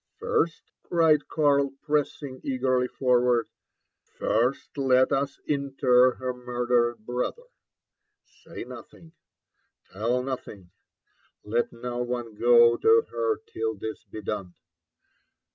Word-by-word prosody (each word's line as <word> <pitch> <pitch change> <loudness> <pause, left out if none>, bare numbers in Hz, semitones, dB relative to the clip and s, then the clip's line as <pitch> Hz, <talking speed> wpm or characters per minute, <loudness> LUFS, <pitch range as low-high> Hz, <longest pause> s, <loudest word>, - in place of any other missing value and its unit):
"First," 165 0 0 0.2
cried 160 -3 +2
Karl, 140 -3 +2
pressing 145 -3 -2
eagerly 130 -1 0
forward, 125 -3 +2 0.3
" - - -55
first 120 +5 0
let 130 -2 +3
ua 140 +1 +2 0.2
inter 135 -3 +3
her 130 -1 -3
murdered 120 -2 -1
brother. 125 - -3 0.8
Say - - -11
nothing— 165 -1 -12 0.8
tell 120 +6 0
nothing— 105 -8 -7 0.7
let 115 +3 -1
no 120 +1 -5
one 120 -2 -3
go 120 +1 +5
to 450 0 +5
her 450 -3 -1
till 445 0 -3
this 110 - -7
be 110 - -9
done. 100 -3 -5
125 Hz, 110 wpm, -26 LUFS, 120-140 Hz, 0.8 s, go